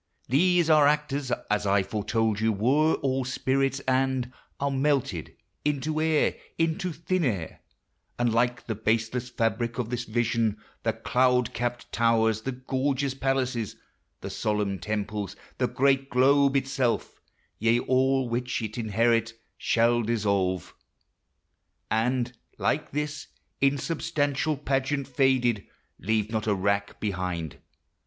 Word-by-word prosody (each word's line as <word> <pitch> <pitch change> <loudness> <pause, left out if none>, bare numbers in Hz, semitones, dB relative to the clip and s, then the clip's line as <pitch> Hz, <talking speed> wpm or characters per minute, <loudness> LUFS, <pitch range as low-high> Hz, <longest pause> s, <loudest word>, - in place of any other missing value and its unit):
These 175 +5 +3
our 155 -2 +6
actors, 145 -3 0 0.2
As 105 -1 +1
I 100 0 +3
foretold 110 +1 -1
you, 110 +1 +2
were 135 +10 +3
all 135 -1 +1
spirits, 135 +1 0
and 130 -1 0 0.3
Are 140 0 0
melted 135 - 0 0.3
into 150 +2 0
air, 160 -1 +2 0.2
into 165 +2 0
thin 170 +3 -1
air; 100 - -2 0.6
And, 120 -2 +1
like 120 +1 +1
the 115 - -2
baseless 115 +3 -1
fabric 115 0 -1
of 120 -2 -3
this 125 0 -2
vision, 115 -2 0 0.2
The 115 - 0
cloud 125 +2 +2
capped 120 +1 -3
towers, 110 -2 +2
the 135 - -3
gorgeous 130 +1 -1
palaces, 130 -4 -1 0.5
The - - -5
solemn 105 -3 -1
temples, 105 +1 -3 0.2
the - - +2
great 135 0 +2
globe 140 +2 +4
itself, 135 -3 -1 0.4
Yea, 115 +2 +3
all 130 0 +2
which 125 +1 -2
it 110 +2 -4
inherit, 115 +1 +1 0.2
shall 120 +1 +2
dissolve, 100 -5 0 1.2
And, 120 +2 0 0.2
like - - 0
this 150 +1 -3 0.3
insubstantial 145 +1 0
pageant 135 0 -1
faded, 125 -5 +2 0.3
Leave 110 +2 0
not 110 -1 -2
a 105 - +3
rack 100 +1 -1
behind. 90 -6 -3
125 Hz, 125 wpm, -27 LUFS, 110-135 Hz, 1.2 s, our